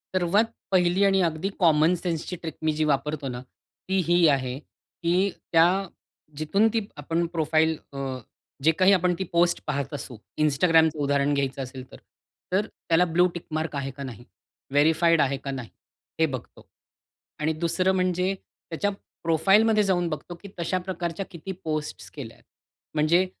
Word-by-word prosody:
सर्वात 185 +5 +3 0.3
पहिली 180 +1 +3
आणि 195 -1 +3
अगदी 165 +4 -3
कॉमन 160 -1 +4
सेन्सची 175 0 -3
ट्रिक 160 -3 -5
मी 155 - +2
जी - - +3
वापरतो 145 0 -1
ना 125 -1 -5 0.5
ती 190 - +2
ही 175 -1 +5
आहे 130 -2 0
की 180 +5 -2 0.2
त्या 165 0 +6 0.7
जिथून 195 +8 +2
ती 220 -3 0
आपण 165 +4 -1
प्रोफाइल 160 0 +2 0.2
अ, 140 - -7 0.7
जे 160 - +6
काही 185 +4 +4
आपण 180 -1 +3
ती 190 - 0
पोस्ट 175 +1 +3
पाहत 140 -2 -2
असू 130 -4 -6 0.2
Instagramचं 160 +1 +4
उदाहरण 140 0 +2
घ्यायचं 135 -1 -1
असेल 130 0 -9
तर - - -11 0.6
तर 200 +3 +2
त्याला 170 -3 +1
ब्लू 180 +1 +6
टिक 170 - -6
मार्क 155 0 -2
आहे 135 -1 -3
का 140 +2 -8
नाही? 120 -3 -8 0.5
व्हेरिफाइड 160 +2 +4
आहे 140 0 +1
का 140 - -3
नाही? 130 -4 -6 0.5
हे 160 - +5
बघतो. 130 -6 -7 0.7
आणि 155 +1 0
दुसरं 170 +4 +1
म्हणजे 185 +1 +1
त्याच्या 190 +1 -5 0.3
प्रोफाइल 165 +6 +4
मध्ये 220 -2 +3
जाऊन 180 -3 +1
बघतो, 170 +3 -6
की 200 +3 -12
तशा 170 +2 0
प्रकारच्या 180 0 -4
किती 170 +3 -7
पोस्ट्स 155 -1 -4
केल्या 125 -6 -8
आहे. - - -25 0.5
म्हणजे 165 +4 +3
165 Hz, 160 wpm, -25 LUFS, 145-180 Hz, 0.7 s, त्या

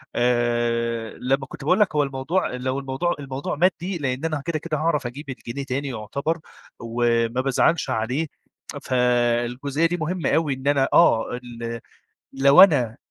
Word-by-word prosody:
آآ 120 -1 0
لمّا 135 +2 0
كنت - - -10
باقول 180 +8 +2
لك 205 -7 +2
هو 150 - +3
الموضوع 135 +6 -1
لو 130 +2 -2
الموضوع 135 +6 -2
الموضوع 135 0 -4
مادِّي 180 +3 0
لإن 135 -1 -2
أنا 155 -3 -2
كده، 170 -2 -1
كده 155 0 -3
هاعرف 155 -4 0
أجيب 140 +4 -9
الجنيه 130 +1 -6
تاني 140 +2 -3
يعتبر 140 +8 -3 0.4
وما 115 +1 0
بازعلش 135 +4 +1
عليه، 125 +6 -1 0.6
فالجزئية 125 +4 +1
دي 175 +1 -2
مهمة 170 +2 -2
أوي 160 -3 +1
إن 130 +1 -6
أنا 140 -2 +3
آه، 115 -9 +4
ال 115 -1 -6 0.5
لو 140 +1 +6
أنا 130 - +2
135 Hz, 150 wpm, -23 LUFS, 120-155 Hz, 0.6 s, لو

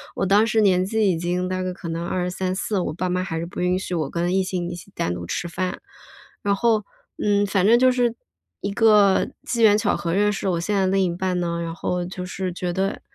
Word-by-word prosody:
我 - - 0
当 205 +4 +4
时 220 0 +2
年 185 -3 +4
纪 215 0 +1
已 165 - -1
经 180 +2 -1
大 185 0 -2
概 185 0 -2
可 180 -1 -9
能 165 +1 -3
23-24， 185 +3 -2
我 175 - -2
爸 180 +2 -2
妈 180 +1 0
还 165 -4 -4
是 165 - -3
不 175 - -8
允 180 +1 +2
许 185 -1 -5
我 155 -5 -1
跟 175 +2 -1
异 190 - +3
性 180 -2 -3
一 175 - -5
起 175 +3 -12
单 85 - -1
独 85 0 -6
吃 170 - -3
饭。 180 +1 -3 0.6
然 200 0 +1
后 220 -1 +2 0.4
嗯， 205 -1 +3
反 195 -1 +1
正 235 +2 +6
就 255 +1 +5
是 245 -2 +1 0.5
一 200 - -2
个 210 -3 +4 0.2
机 235 -1 -2
缘 210 -2 +6
巧 225 - +1
合 170 -1 -2
认 210 +2 +3
识 195 - -3
我 175 -3 +1
现 205 +5 -1
在 190 -1 +2
另 195 +1 +2
一 170 -2 -1
半 180 -1 -1
呢， 170 -1 -2
然 165 0 -4
后 180 0 -2
就 180 0 -6
是 185 0 -4
觉 180 0 -3
得， 195 +2 -1
185 Hz, 260 characters per minute, -23 LUFS, 175-205 Hz, 0.6 s, 正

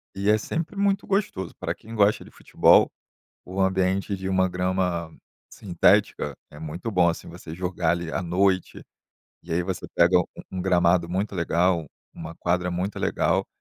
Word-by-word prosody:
e 100 +1 0
é 110 - +5
sempre 160 - -4
muito 200 0 +1
gostoso, 195 - -1
pra - - -2
quem 115 +1 -11
gosta 105 0 +3
de - - -15
futebol, - - +4 0.5
o 95 +2 -6
ambiente 95 +1 +1
de 95 0 -6
uma 95 0 +2
grama 90 -2 -1 0.3
sintética 90 -5 +1 0.2
é 75 - -14
muito 80 +7 -5
bom, 90 -5 +3
assim, 85 - -5
você 80 - -9
jogar 90 -1 -1
ali, 85 -1 -3
à - - -2
noite, 95 +2 0 0.6
e 85 - -14
aí 85 +2 +1
você 95 0 -4
pega 85 +1 +5
um 90 - +1 0.3
um 95 - -4
gramado 90 -1 +2
muito 95 +4 -2
legal, 85 -1 +1 0.3
uma 80 0 -8
quadra 90 +1 -1
muito 90 +3 -3
legal, - - 0
90 Hz, 170 wpm, -25 LUFS, 85-95 Hz, 0.6 s, é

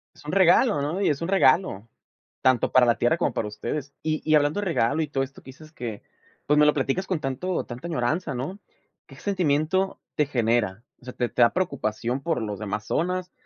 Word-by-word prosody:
Es - - -18
un 150 - -4
regalo, 190 - +4
¿no? 160 +7 -2
Y - - +3
es 145 +1 -1
un 165 - -2
regalo, 130 - +3 0.5
tanto 130 -2 +3
para 130 -1 +6
la 120 -1 +2
tierra 120 +8 +2
como 155 -7 0
para 110 - -2
ustedes. 130 +7 -5
Y 155 -1 -1
y 155 - +6
hablando 150 +5 +2
de 205 - -3
regalo 155 -3 +1
y 155 - -1
todo 135 -1 -1
esto 140 +2 -9
que - - -14
dices 155 +4 -13
que, 115 -8 -6 0.4
pues 150 +1 +3
me 150 - +6
lo 150 - +5
platicas 145 +7 -1
con 185 -4 -1
tanto 150 +7 -2
tanta 125 +7 -7
añoranza, 155 +2 -1
¿no? 150 +12 -5 0.5
¿Qué 135 - -14
sentimiento 185 0 0 0.2
te 150 - +2
genera? 115 -6 0 0.2
O - - -18
sea, 125 - -7
¿te 120 -1 -1
te - - -1
da 115 - +4
preocupación 125 -7 -2
por 165 -6 -1
los 105 -2 -4
demás 105 0 -4
zonas? 180 +2 -1
145 Hz, 220 wpm, -25 LUFS, 120-170 Hz, 0.5 s, para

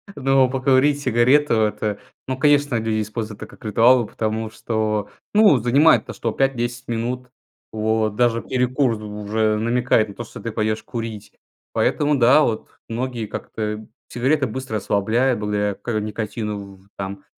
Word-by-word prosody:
Ну, 135 -1 +3
покурить 135 +2 +2
сигарету- 135 +4 +3
это, 105 -1 -1 0.3
ну, 130 0 -2
конечно, 145 -2 +3
люди 110 -1 0
используют 110 0 -5
это - - -8
как - - -17
ритуал, 115 +3 +4
потому 110 +1 -3
что, 110 -2 -2 0.2
ну, 210 -8 +6
занимает 125 +1 +4
то - - -7
что 115 - -3
5-10 120 -1 -1
минут. 125 +2 -3 0.4
Вот, 110 -1 0
даже 115 0 +2
перекур 125 -2 0
у 105 0 -7
уже 110 +1 +1
намекает 115 0 +1
на - - -9
то, 120 - -6
что - - -11
ты 115 - -4
пойдешь 110 0 -1
курить. 115 -3 -6 0.4
Поэтому, 150 0 +1
да, 130 +4 +6
вот 115 -7 -1 0.2
многие 120 0 -3
как-то 105 +1 -5 0.2
Сигарета 130 +4 +1
быстро 130 0 -5
расслабляет 110 +5 +1
благодаря 105 -1 -1
к 110 +2 -3
никотину 105 -2 -5
в 95 +1 -23
там. 95 0 -6
115 Hz, 150 wpm, -21 LUFS, 110-130 Hz, 0.4 s, ну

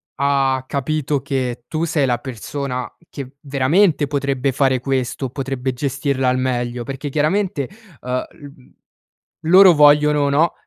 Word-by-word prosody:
ha 135 -2 +1
capito 145 0 -1
che 125 -3 -3
tu 160 +1 -2
sei 155 -4 +1
la 120 -2 +1
persona 125 +1 -5 0.2
che 140 -1 -9
veramente, 145 +4 +2
potrebbe 140 -1 -1
fare 135 -1 +1
questo, 130 0 -2
potrebbe 130 -1 -3
gestirla 135 0 -1
al 125 - +1
meglio, 120 -1 -2
perché 135 +2 -6
chiaramente, 155 0 0 0.3
uhm, 125 0 -3 1.2
l 160 - -3
loro 185 0 +8
vogliono, 150 -1 +4
no, 155 +4 +2
140 Hz, 130 wpm, -19 LUFS, 130-150 Hz, 1.2 s, loro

